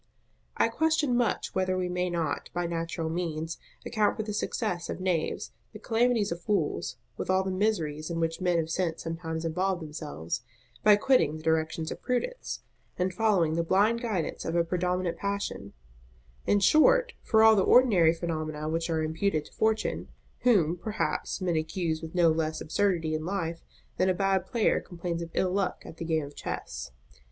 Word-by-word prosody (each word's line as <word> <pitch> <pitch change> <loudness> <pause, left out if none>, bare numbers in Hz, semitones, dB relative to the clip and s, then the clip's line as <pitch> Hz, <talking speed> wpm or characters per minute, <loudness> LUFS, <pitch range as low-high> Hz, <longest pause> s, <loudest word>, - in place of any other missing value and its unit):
I - - +4
question 315 -5 +2
much 240 -1 0
whether 185 0 +1
we 180 -1 0
may 180 0 -1
not, 170 -2 -2
by 175 0 0
natural 165 -1 -2
means, 165 -1 -3 0.3
account 215 -3 +1
for 220 - -1
the 210 0 -4
success 205 -4 -2
of - - -4
knaves, 180 -4 -1 0.2
the - - -7
calamities 230 -3 +2
of 170 +1 -4
fools, 170 -9 -1 0.2
with - - -4
all 185 0 +3
the 190 - -2
miseries 170 -7 -1
in 170 -1 -2
which 165 +1 -1
men 180 -2 +2
of 165 -1 -1
sense 165 -1 -1
sometimes 165 0 -4
involve 180 +3 0
themselves, 150 - -5 0.4
by 210 -1 +8
quitting 205 - +3
the 155 - -11
directions 160 0 0
of - - -7
Prudence, - - -2 0.3
and 180 0 0
following 185 -6 +2
the 165 - +1
blind 205 +7 +3
guidance 210 -10 -2
of 165 - -2
a 170 - +4
predominant 180 +1 -1
passion; 200 - -3 0.8
in 205 - +3
short, - - +5
for 220 -1 +4
all 220 0 +8
the 195 - +4
ordinary 190 -8 +6
phenomena 155 -2 -3
which 165 +2 -1
are 160 -1 0
imputed 160 0 0
to - - -15
Fortune; 220 0 0 0.3
whom, 180 -9 +3
perhaps, 215 0 -2
men 175 -2 0
accuse 160 0 -1
with 160 +1 -8
no 170 -2 +5
less 155 0 -1
absurdity 165 -2 0
in 155 0 -2
life, 170 -2 -3 0.4
than 185 - +3
a 185 - +2
bad 195 -1 +1
player 225 +1 +2
complains 170 -1 -4
of 170 - -5
ill 185 - +2
luck 195 -1 -1
at 165 - -10
the 165 - -5
game 160 -2 0
of 145 - -12
chess. - - -5
175 Hz, 180 wpm, -28 LUFS, 160-200 Hz, 0.8 s, by